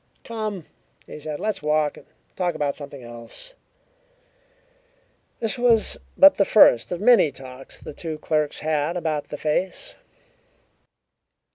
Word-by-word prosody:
"Come," 215 -6 -5 0.4
he - - -10
said. 150 0 -5
"Let's 215 -6 -2
walk 150 0 +1
and - - -16 0.3
talk 175 -3 -1
about 145 -2 -1
something 140 -3 -9
else." 120 - -7 1.9
This 225 +1 -2
was 235 -3 +3 0.2
but 290 0 +8
the 200 - +5
first 155 - +5
of 175 - -2
many 220 -8 +5
talks 130 0 -9
the - - -9
two 160 +1 -5
clerks 150 -1 -1
had 155 +2 0
about 155 -3 -2
the - - -7
face. 185 - -2
155 Hz, 130 wpm, -23 LUFS, 145-210 Hz, 1.9 s, but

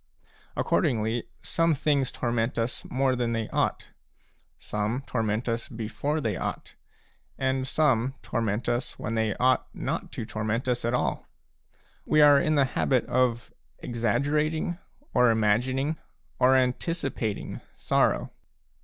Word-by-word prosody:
Accordingly, 110 0 +1 0.2
some 165 -1 +2
things 140 -2 +1
torment 120 0 -1
us 115 +1 -2
more 130 0 +1
than 120 -2 -1
they 115 -1 -1
ought; - - -1 0.7
some 105 +5 -2
torment 110 -1 -1
us 115 0 -2
before 115 +7 -2
they 110 -9 -1
ought; - - -4 0.6
and 130 0 0
some 130 -4 +2
torment 115 -1 -1
us 120 +1 -1
when 115 - -4
they 110 -2 0
ought 130 +1 +2
not - - -3
to - - -4
torment 110 +3 -2
us 125 -1 0
at 120 +1 +1
all. - - -1 0.8
We 155 - +2
are 145 -1 +8
in 155 -2 +2
the 140 -2 +4
habit 130 0 +1
of 120 -2 0 0.2
exaggerating, 150 - 0 0.3
or 125 -1 +5
imagining, 125 +7 +1 0.4
or 130 +1 +5
anticipating, 130 - -1
sorrow. - - +1
125 Hz, 125 wpm, -27 LUFS, 115-135 Hz, 0.8 s, are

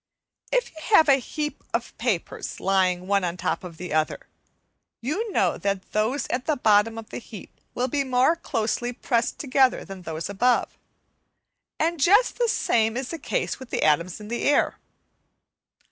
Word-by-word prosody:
If - - +1
you 315 - -11
have 320 - +7
a 275 - +7
heap 295 +3 -5
of 235 0 -3
papers 225 -7 -2
lying 185 -2 +1
one 200 0 +2
on 175 -1 -1
the - - -11
top - - -1
of 170 -3 -9
the 180 -2 -6
other, 155 0 0 0.8
you 385 - -2
know - - +1
that 200 -1 -2
those 225 +6 0
at 250 0 -2
the 310 - +2
bottom 220 0 +3
of 225 -1 -9
the - - -5
heap 220 -4 -12
will 250 +1 0
be 280 +2 0
more 260 +4 +3
closely 240 -5 -2
pressed 235 -1 -1
together 265 -2 +2
than 195 -1 -9
those 160 -2 -5
above, 240 +5 +1 1.0
and 330 +1 0
just 410 - +4
the 480 - +3
same 225 - +1
is 260 -1 -3
the 330 - -5
case - - -2
with 260 -2 -10
the - - -1
atoms 170 +5 +2
of 210 0 -10
the 240 - -2
air. 290 - +2
235 Hz, 175 wpm, -25 LUFS, 195-275 Hz, 1.0 s, have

